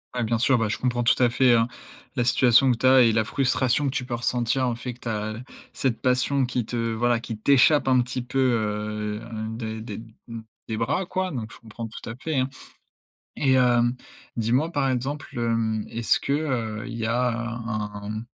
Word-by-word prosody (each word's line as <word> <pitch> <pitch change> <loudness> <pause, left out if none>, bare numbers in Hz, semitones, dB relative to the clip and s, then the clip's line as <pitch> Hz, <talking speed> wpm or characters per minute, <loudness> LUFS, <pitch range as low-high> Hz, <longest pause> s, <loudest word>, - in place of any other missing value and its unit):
Ouais, 125 - 0
bien 115 0 0
sûr, 130 +1 +3
bah, 115 -1 0
je - - -1
comprends 120 -1 0
tout 120 - +3
à 120 - +5
fait, 125 0 +4
hein, 115 0 +3 0.5
la 120 - +1
situation 125 +1 +5
que 120 - 0
tu 130 - -2
as 130 0 +7
et 115 -2 +5
la 110 0 +2
frustration 130 +2 +1
que 135 - 0
tu 125 -2 -3
peux 120 -2 -3
ressentir. 125 +2 0
Le - - -1
fait 125 +1 -6
que - - -25
tu - - -7
as 110 0 -3 0.4
cette 125 -4 -1
passion 130 +1 +2
qui 120 -2 -2
te, 120 - -6 0.2
voilà, 120 0 +2
qui 115 -2 -6
t'échappe 140 +5 +4
un 130 -1 +4
petit 125 0 -4
peu, 130 +2 -3
heu, 105 -3 -1 0.3
des 110 -1 -5
des 110 -1 -7 0.3
m 115 -1 -7 0.2
des 110 - -3
bras, 145 - 0
quoi. 185 +1 -2
Donc 115 -6 -5
je - - -14
comprends 115 0 -8
tout 110 - -9
à 115 - -6
fait, 150 +2 -3
hein. 130 +1 +1 0.9
Et 135 -2 +2
hem, 120 -1 +3 0.4
dis-moi, 125 +9 +1
par 135 -2 +1
exemple, 135 +4 -3
hem, 115 -2 0
est-ce 115 -1 +1
que, 140 - -3
heu, 125 -7 -2
il 115 - -6
y 110 - -1
a 125 +2 +1
un 110 -3 -4
un 110 - -4
120 Hz, 215 wpm, -25 LUFS, 115-130 Hz, 0.9 s, as